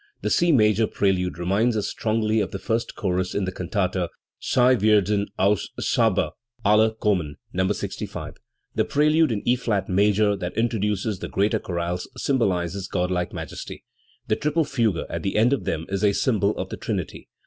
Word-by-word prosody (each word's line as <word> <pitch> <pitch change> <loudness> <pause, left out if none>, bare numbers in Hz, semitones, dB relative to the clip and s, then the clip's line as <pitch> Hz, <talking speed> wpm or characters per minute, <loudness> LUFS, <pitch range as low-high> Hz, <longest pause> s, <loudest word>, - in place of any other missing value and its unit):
The - - 0
C 175 0 +3
major 110 -4 +4
prelude 90 -3 0
reminds 100 +7 +1
us 105 - -1
strongly 110 0 0
of 100 - -1
the - - -5
first 115 +4 -2
chorus 95 -2 -1
in 100 - 0
the 95 - -3
can 90 -1 -6
tata 90 -2 0 0.3
Sie 125 0 +3
warden 105 -1 +3
aus 100 0 +2
Saba - - +2 0.3
alle 110 +2 +4
kommen 90 -10 0 0.2
(No. 95 +1 +1
65). - - -5 0.4
The - - +2
prelude 150 0 +3
in 105 -3 -3
E 125 - +5
flat 105 -6 -1
major, 105 +2 +3
that 90 -2 -5
introduces 105 -3 0
the - - -5
greater 105 +3 +1
chorales, 90 -1 -3
symbolises 95 - 0
godlike 90 -1 -1
majesty. - - -7 0.4
The 110 - +1
triple 150 +2 +1
fugue 115 - 0
at 85 - -4
the 95 - -2
end 115 +5 +4
of 140 - -2
them 80 +1 -2
is 100 +1 -2
a 100 -1 +4
symbol 105 -3 +1
of - - -4
the - - -6
Trinity. - - -4
105 Hz, 175 wpm, -24 LUFS, 95-110 Hz, 0.4 s, E